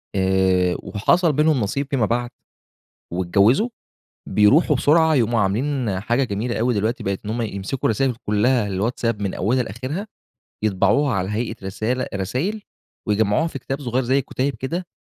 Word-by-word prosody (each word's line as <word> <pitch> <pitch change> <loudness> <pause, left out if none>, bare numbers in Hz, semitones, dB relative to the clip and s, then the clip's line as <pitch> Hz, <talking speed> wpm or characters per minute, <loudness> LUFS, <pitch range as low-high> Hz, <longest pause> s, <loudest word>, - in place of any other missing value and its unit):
آآ، 95 -1 +2
وحصل 155 - +2
بينهم 150 0 +3
نصيب 140 +7 -2
فيما 130 -6 +1
بعد، 120 +3 -1 0.8
واتجوزوا، 100 - +3 0.6
بيروحوا 135 +9 +4
بسرعة 155 +4 +4
يقوموا 120 -3 +2
عاملين 110 0 0
حاجة 120 +6 +1
جميلة 115 +1 -2
أوي 120 +2 +2
دلوقتي 110 +3 -1
بقت 100 0 -2
إن - - -4
هم 120 +2 -2
يمسكوا 105 +3 -4
الرسايل 125 +3 +1
كلها 105 +2 +2
الواتساب 105 +3 -1
من 100 -2 -2
أولها 125 +7 +1
لآخرها، 130 - -5 0.6
يطبعوها 110 +7 +2
على 95 -1 -1
هيئة 115 +2 -2
رسالة 115 +6 -2
رسايل 130 - -2 0.5
ويجمعوها 105 +8 +2
في 160 - -5
كتاب 135 +2 -5
صغير 130 -1 -1
زي 130 +3 +2
كتيب 135 +2 -2
كده، 165 +10 -4
120 Hz, 150 wpm, -22 LUFS, 100-135 Hz, 0.8 s, بيروحوا